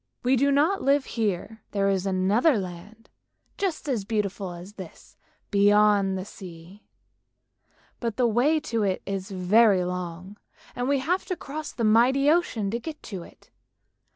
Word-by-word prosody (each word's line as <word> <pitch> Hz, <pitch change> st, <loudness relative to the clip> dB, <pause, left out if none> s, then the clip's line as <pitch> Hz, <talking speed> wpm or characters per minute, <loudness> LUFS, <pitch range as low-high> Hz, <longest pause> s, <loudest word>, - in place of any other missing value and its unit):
We 255 Hz, +2 st, +3 dB
do 280 Hz, +3 st, +2 dB
not 310 Hz, +8 st, +2 dB
live 275 Hz, 0 st, +2 dB
here; 220 Hz, 0 st, -3 dB
there 200 Hz, -1 st, +1 dB
is 195 Hz, -1 st, 0 dB
another 200 Hz, -, +2 dB
land, 195 Hz, +4 st, -8 dB, 0.5 s
just 370 Hz, -7 st, -3 dB
as 245 Hz, -8 st, -1 dB
beautiful 200 Hz, -2 st, -2 dB
as 175 Hz, +3 st, -10 dB
this, 190 Hz, -5 st, -12 dB, 0.4 s
beyond 205 Hz, -1 st, +4 dB
the 185 Hz, -, -5 dB
sea; 180 Hz, 0 st, -12 dB, 1.1 s
but 230 Hz, -3 st, -3 dB
the 250 Hz, -, +3 dB
way 250 Hz, +8 st, +2 dB
to 230 Hz, -7 st, -2 dB
it 195 Hz, -2 st, -1 dB
is 195 Hz, -1 st, -4 dB
very 195 Hz, +1 st, +4 dB
long 180 Hz, +2 st, -6 dB, 0.4 s
and 245 Hz, +2 st, -2 dB
we 280 Hz, -, +3 dB
have 340 Hz, +8 st, -1 dB
to 365 Hz, -, -2 dB
cross 300 Hz, 0 st, -7 dB
the 235 Hz, -, -4 dB
mighty 250 Hz, +6 st, +4 dB
ocean 240 Hz, -, 0 dB
to 235 Hz, -, -2 dB
get 305 Hz, +4 st, -8 dB
to 190 Hz, -4 st, -6 dB
it. -, -, -16 dB
210 Hz, 155 wpm, -25 LUFS, 190-265 Hz, 1.1 s, beyond